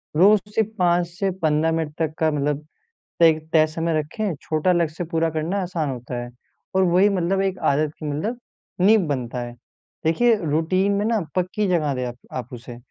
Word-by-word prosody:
रोज़ 200 +5 +6
सिर्फ़ 220 0 +1
5 175 -1 +3
से 185 +3 -2
15 155 0 +2
मिनट 160 -2 -2
तक 160 -2 0
का 160 - +3
मतलब 150 0 -1 0.6
एक 160 -1 +5
तय 155 -1 +6
समय 165 0 -1
रखें, 190 +6 -3
छोटा 155 +3 +1
लक्ष्य 170 0 0
पूरा 165 0 +1
करना 160 +5 -2
आसान 170 -5 -2
होता 125 -1 -5
है। 120 - -8 0.5
और 190 - +4
वही 185 +3 +4
मतलब 190 0 0
एक 190 -1 -1
आदत 150 +1 0
की 155 - -6
मतलब 210 +12 -2 0.4
नींव 210 +3 +6
बनता 125 -3 -3
है। 120 0 -6 0.5
देखिए 225 +9 +4
रूटीन 165 +6 +1
में 200 +1 0
ना 225 0 +2 0.2
पक्की 185 +3 0
जगह 160 -6 +1
दें 125 0 -2
आप 120 - -6 0.2
आप 125 -2 -4
उसे। 120 0 -9
165 Hz, 185 wpm, -23 LUFS, 150-190 Hz, 0.6 s, रोज़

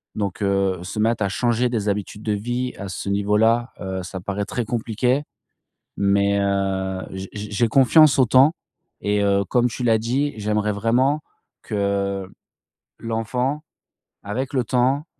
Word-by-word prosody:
donc 100 -1 -3
heu, 95 -2 +1
se 105 - -7
mettre 110 -1 +1
à 100 - 0
changer 120 +4 +1
des 110 -4 -1
habitudes 105 +1 -4
de 110 - -1
vie 120 +4 -2
à 100 - -6
ce 100 +1 -5
niveau 100 +1 +1
là, 115 +3 +2
heu, 95 -1 -3
ça 95 +1 -6
paraît 100 +1 -3
très 120 - -3
compliqué, 120 +4 0 0.7
mais 100 0 +2
heu, 95 -1 -1
j 95 0 -6
j 105 0 -6
j'ai 115 +3 +2
confiance 135 +5 +5
au 130 - +5
temps 130 +6 +5 0.5
et 105 0 +1
heu, 100 0 +2
comme 120 +6 +2
tu 125 - -6
l'as 115 -2 +4
dit, 130 +5 -1
j'aimerais 105 0 0
vraiment 125 +8 +1 0.4
que 100 -2 -1 0.7
l'enfant, 125 +6 -2 0.6
avec 125 +7 -4
le 130 -2 +1
temps, 130 +5 +1
105 Hz, 160 wpm, -22 LUFS, 100-125 Hz, 0.7 s, confiance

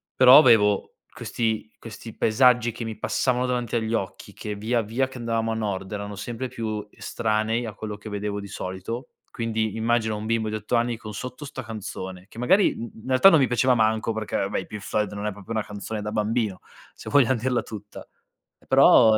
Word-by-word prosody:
Però 130 +1 +9
avevo 110 -7 +5 0.2
questi 110 -2 -2
questi 115 0 -10
paesaggi 120 +1 +4
che 115 +1 -6
mi 110 -1 -5
passavano 125 -1 0
davanti 125 -2 -1
agli 115 -1 -1
occhi 95 -4 -4
che, 105 -1 -5
via 115 +3 0
via 115 +5 -1
che 130 - -10
andavamo 115 -1 -1
a 110 - -1
nord, 95 -3 -3
erano 100 0 -5
sempre 120 +5 -4
più 110 -3 -4
estranei, 110 +1 -1
a 110 - -6
quello 105 -1 -6
che 105 +1 -9
vedevo 105 0 -3
di 100 - -7
solito, 95 +6 -5 0.2
quindi 110 -2 -2
immagina 115 0 +1
un 105 +1 -5
bimbo 115 0 0
di 110 - -3
8 110 +3 -2
anni 120 0 +1
con 110 -2 -8
sotto 125 +6 -7
'sta 135 -1 -6
canzone; 95 -4 -7
che - - -15
magari, 190 +11 +4
mhmm, 115 - -6
in - - -12
realtà 130 +8 +7
non 165 - +5
mi 135 - +4
piaceva 125 +1 +3
manco 110 0 +1
perché 110 -1 -4
vabbè 100 +1 -1
i - - -10
Pink 105 -1 -7
Floyd 105 0 -1
non 100 +1 -5
è 105 - -1
proprio 100 +2 -12
una 110 -1 0
canzone 105 +1 -5
da 105 0 -4
bambino, 105 -2 -1 0.3
se - - -9
vogliam 130 -3 +4
dirla 125 +1 0
tutta, 105 -2 -10 0.6
e - - -26
però 110 -1 +7
110 Hz, 205 wpm, -25 LUFS, 105-120 Hz, 0.6 s, Però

